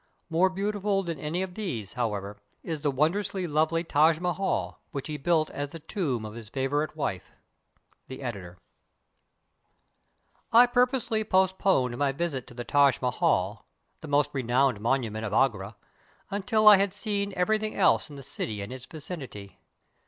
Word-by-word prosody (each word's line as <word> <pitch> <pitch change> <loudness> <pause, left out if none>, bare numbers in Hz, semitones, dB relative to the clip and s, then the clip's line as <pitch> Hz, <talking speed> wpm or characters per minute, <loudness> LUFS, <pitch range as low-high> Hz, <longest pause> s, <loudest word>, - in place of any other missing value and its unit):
More 175 +3 +4
beautiful 200 +1 -1
than 165 -5 -4
any 160 +6 -2
of 185 -1 -6
these, 130 - -4
however, 105 -4 -3 0.3
is 160 -3 -4
the 145 - +1
won 150 +5 +2
drously 195 -2 -2
lovely 160 +2 +1
Taj 160 0 +3
Mahal, 180 +2 -2
which 140 - -5
he 155 - -4
built 155 +1 +1
as 145 +1 -5
the 165 - -7
tomb 150 - -2
of 105 - -7
his 115 -2 -10
favorite 145 +5 -1
■wife. 100 - -3 0.8
The 130 +1 -8
Editor] 95 -7 -6 1.9
I 240 +1 +8
PURPOSELY 245 -3 +1
postponed 190 - +2
my 140 -1 +2
\'isit 140 -4 -3
to 120 - -13
the 120 - -5
Taj 140 0 +4
Mahal 105 -4 0 0.2
— - - -46
the 160 - -8
most 145 0 +2
renowned 130 -3 +1
monument 115 -2 0
of 105 -2 -3
Agra 110 -4 +1 0.3
— - - -33
until 215 +2 +1
I 210 -1 +11
had 195 0 0
seen 205 -1 -1
ever\'thlng 215 +4 0
else 185 - +3
in 145 - -10
the 140 - -9
city 110 -4 -4
and 105 +6 -7
its 130 -1 -10
N 160 - -8
icinity. 135 - -8
150 Hz, 165 wpm, -27 LUFS, 125-190 Hz, 1.9 s, I